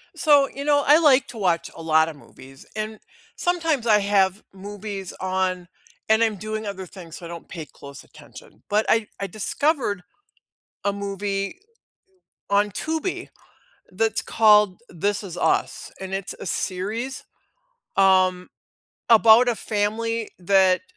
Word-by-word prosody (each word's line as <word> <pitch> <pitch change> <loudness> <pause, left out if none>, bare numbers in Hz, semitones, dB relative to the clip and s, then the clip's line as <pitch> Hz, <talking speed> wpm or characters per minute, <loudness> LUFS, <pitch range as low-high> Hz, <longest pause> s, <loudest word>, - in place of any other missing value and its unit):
So, 290 -3 +4
you 280 - -7
know, 290 -1 +3
I 295 +3 +6
like 280 -4 +4
to 240 - -10
watch 180 -5 0
a 165 - -9
lot 160 0 +3
of 155 - -9
movies, 135 -1 -15
and 215 0 -4 0.4
sometimes 325 -8 0
I 210 -2 +5
have 200 0 +1
movies 200 -1 -7
on 185 -1 -1 0.4
and 220 +1 +4
I'm 220 -2 0
doing 215 +2 -5
other 195 -2 -5
things, 175 -3 -11
so 175 - -10
I - - -8
don't 170 -1 -9
pay 165 -4 -7
close 140 -1 -12
attention, - - -16
but 210 +1 +2
I 225 -1 +2
I 195 - -3
discovered 215 - -1 0.8
a 200 - +1
movie 200 - -3 0.9
on 205 +1 +2
Tubi 320 - -3 0.7
that's 220 +4 0
called 210 -3 +4
"This 200 +4 -2
Is 185 -4 -8
Us", - - 0
and 190 0 -6
it's 195 -1 -4
a - - -6
series, 210 +9 -3 0.7
um, 185 -2 +3 0.6
about 230 +1 +7
a 240 - +1
family 220 +2 -2
that 185 0 +3
205 Hz, 145 wpm, -23 LUFS, 185-225 Hz, 0.9 s, about